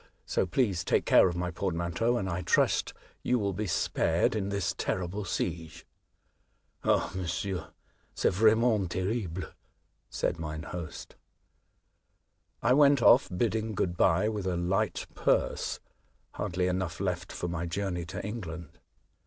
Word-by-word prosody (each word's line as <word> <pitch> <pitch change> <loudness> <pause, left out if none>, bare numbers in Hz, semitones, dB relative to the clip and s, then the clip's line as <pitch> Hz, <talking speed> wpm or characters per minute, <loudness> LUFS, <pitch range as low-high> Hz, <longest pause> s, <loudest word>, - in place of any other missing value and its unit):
So - - 0
please 95 -2 +1
take - - +1
care - - +6
of 85 - -4
my 90 0 -2
portmanteau, 90 +6 -1
and 95 - -2
I 90 0 -2
trust 90 - +2 0.3
you 125 - +1
will 100 -3 -1
be 105 +3 -3
spared 85 +1 +1
in 100 -2 -1
this 100 -3 -1
terrible 95 +3 -2
siege." 80 -2 -4 0.5
'* - - -42
Ah, - - +2
monsieur, 95 +1 -3 0.5
c'est - - +2
vraiment 110 0 +3
terrible," 95 -1 -2 0.7
said 80 - -1
mine 80 -1 -5
host. 85 -2 -7 1.5
I - - +4
went 140 -2 +5
off, 130 - +6
bidding 110 +3 -1
good 85 -2 0
bye, 95 +3 +3
with 105 -3 -2
a 90 -2 0
light 90 +2 0
purse, - - 0 0.3
— - - -40
hardly 90 0 -2
enough 90 -2 -2
left 90 -2 -2
for - - -4
my 85 0 -3
journey 90 0 -2
to 80 - -6
England. 85 -8 -7
95 Hz, 145 wpm, -29 LUFS, 85-105 Hz, 1.5 s, care